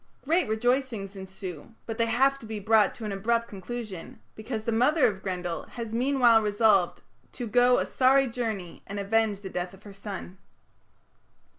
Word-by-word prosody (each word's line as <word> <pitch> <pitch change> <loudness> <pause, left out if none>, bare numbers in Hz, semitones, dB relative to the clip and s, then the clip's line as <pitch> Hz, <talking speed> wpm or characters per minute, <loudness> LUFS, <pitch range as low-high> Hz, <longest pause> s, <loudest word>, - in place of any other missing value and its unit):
Great 335 +2 +2
rejoicings 225 -2 -1
ensue, 190 0 -8
but 225 - -4
they 230 - +3
have 270 +4 +2
to 225 - -11
be 215 -1 -4
brought 215 0 +3
to 225 - -7
an 210 - -3
abrupt 230 +4 0
conclusion, 205 -2 -7
because 220 0 -5
the 230 - 0
mother 260 +7 +3
of 190 -2 0
Grendel 180 -3 -3
has 230 -2 -6
meanwhile 245 -2 +4
resolved 205 -3 +2 0.3
"to 245 - -5
go 245 +3 +4
a - - +1
sorry 270 +1 +4
journey 225 -8 -4
and 200 +1 -5
avenge 210 0 +1
the 195 - -6
death 180 +1 -4
of 195 - -21
her 205 - -11
son". 195 -2 -8
220 Hz, 170 wpm, -27 LUFS, 195-240 Hz, 0.3 s, meanwhile